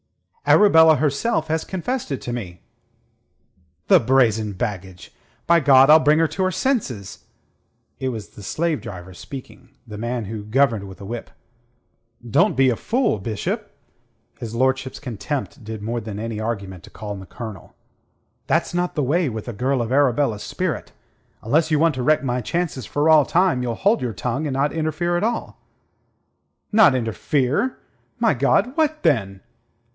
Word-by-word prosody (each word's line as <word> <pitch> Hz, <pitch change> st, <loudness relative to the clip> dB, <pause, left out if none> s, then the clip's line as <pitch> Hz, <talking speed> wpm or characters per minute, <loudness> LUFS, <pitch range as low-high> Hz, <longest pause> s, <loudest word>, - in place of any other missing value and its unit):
"Arabella 160 Hz, -6 st, +6 dB
herself 155 Hz, +5 st, 0 dB
has 160 Hz, 0 st, -1 dB
confessed 215 Hz, -, -4 dB
it 135 Hz, -, -2 dB
to 120 Hz, -, -5 dB
me." 90 Hz, -8 st, -6 dB, 1.3 s
"The -, -, +7 dB
brazen 110 Hz, -4 st, +2 dB
baggage! 95 Hz, -2 st, -6 dB, 0.3 s
By 170 Hz, 0 st, +5 dB
God, 135 Hz, -1 st, +6 dB
I'll 155 Hz, -, +9 dB
bring 155 Hz, 0 st, +3 dB
her 165 Hz, 0 st, +3 dB
to 170 Hz, +6 st, -2 dB
her 185 Hz, -, +1 dB
senses." 165 Hz, -, -2 dB, 0.7 s
It 130 Hz, -, -1 dB
was 110 Hz, -5 st, -6 dB
the -, -, -13 dB
slave 155 Hz, -, -1 dB
driver 95 Hz, -5 st, -9 dB
speaking, 130 Hz, +4 st, -10 dB, 0.2 s
the 105 Hz, -3 st, -9 dB
man 120 Hz, 0 st, -3 dB
who 105 Hz, +1 st, -6 dB
governed 115 Hz, -2 st, +1 dB
with 95 Hz, -, -12 dB
a 100 Hz, -, -9 dB
whip. 115 Hz, +3 st, -6 dB, 1.0 s
"Don't 115 Hz, -, +2 dB
be 130 Hz, -1 st, +4 dB
a -, -, 0 dB
fool, 240 Hz, -, 0 dB
Bishop." 100 Hz, -, -4 dB, 0.7 s
His 115 Hz, -1 st, -6 dB
lordship's 130 Hz, +1 st, 0 dB
contempt 135 Hz, +2 st, -5 dB
did 110 Hz, -1 st, -7 dB
more 115 Hz, +2 st, -2 dB
than 105 Hz, -1 st, -6 dB
any 110 Hz, -1 st, -4 dB
argument 100 Hz, -5 st, -4 dB
to -, -, -15 dB
calm 105 Hz, -2 st, -7 dB
the 95 Hz, -, -11 dB
Colonel. 110 Hz, -6 st, -9 dB, 0.7 s
"That's -, -, +1 dB
not 175 Hz, 0 st, -1 dB
the 150 Hz, -, 0 dB
way 155 Hz, +4 st, +1 dB
with 110 Hz, -1 st, -6 dB
a 120 Hz, -, -4 dB
girl 130 Hz, +4 st, 0 dB
of 115 Hz, -, -5 dB
Arabella's 130 Hz, -5 st, +2 dB
spirit. 180 Hz, -, -3 dB, 0.5 s
Unless 155 Hz, +8 st, +2 dB
you 155 Hz, -, +2 dB
want 165 Hz, +1 st, +3 dB
to 130 Hz, -, -3 dB
wreck 155 Hz, +2 st, +3 dB
my 125 Hz, -1 st, -1 dB
chances 145 Hz, -, -3 dB
for 145 Hz, +2 st, 0 dB
all 155 Hz, -2 st, +7 dB
time, 170 Hz, -3 st, +2 dB
you'll 120 Hz, -2 st, -2 dB
hold 205 Hz, -, +2 dB
your 120 Hz, -3 st, -2 dB
tongue, 130 Hz, +9 st, -2 dB
and 140 Hz, -, -3 dB
not 140 Hz, +2 st, 0 dB
interfere 160 Hz, +2 st, -1 dB
at 175 Hz, -, 0 dB
all." 230 Hz, +1 st, -3 dB, 1.1 s
"Not 210 Hz, -10 st, +6 dB
interfere? 130 Hz, -, 0 dB, 0.4 s
My 230 Hz, -5 st, +3 dB
God, 145 Hz, -, +1 dB
what, 310 Hz, -1 st, 0 dB
then?" 100 Hz, -, +1 dB
130 Hz, 165 wpm, -22 LUFS, 110-160 Hz, 1.3 s, I'll